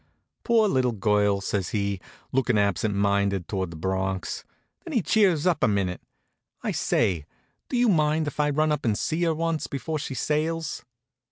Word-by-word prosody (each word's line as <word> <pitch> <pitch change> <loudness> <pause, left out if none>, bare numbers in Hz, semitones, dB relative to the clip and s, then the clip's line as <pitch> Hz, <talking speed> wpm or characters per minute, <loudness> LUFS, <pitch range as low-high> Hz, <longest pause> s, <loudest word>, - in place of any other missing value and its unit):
"Poor 230 -3 +4
little 130 -9 +1
girl!" 105 -1 +2
says 100 -2 -2
he, 100 -3 -1 0.3
looking 125 -3 +2
absent 100 +1 +1
minded 100 -2 +1
towards 95 -3 -2
the 85 - -9
Bronx. 95 +2 -2 0.4
Then 335 - -7
he 230 -7 +2
cheers 185 -8 +3
up 175 -4 +2
a - - +6
minute. 100 -4 0 0.6
"I - - 0
say, 85 -6 0 0.4
do 250 - -1
you 245 0 +4
mind 155 -4 +2
if 145 - -6
I 150 0 +3
run 155 +2 +2
up 150 -1 -1
and 110 -3 +1
see 160 +2 -1
her 165 -1 +1
once 165 -1 -1
before 155 +3 -3
she 140 -2 -5
sails?" 160 +5 -1
125 Hz, 175 wpm, -26 LUFS, 100-160 Hz, 0.6 s, a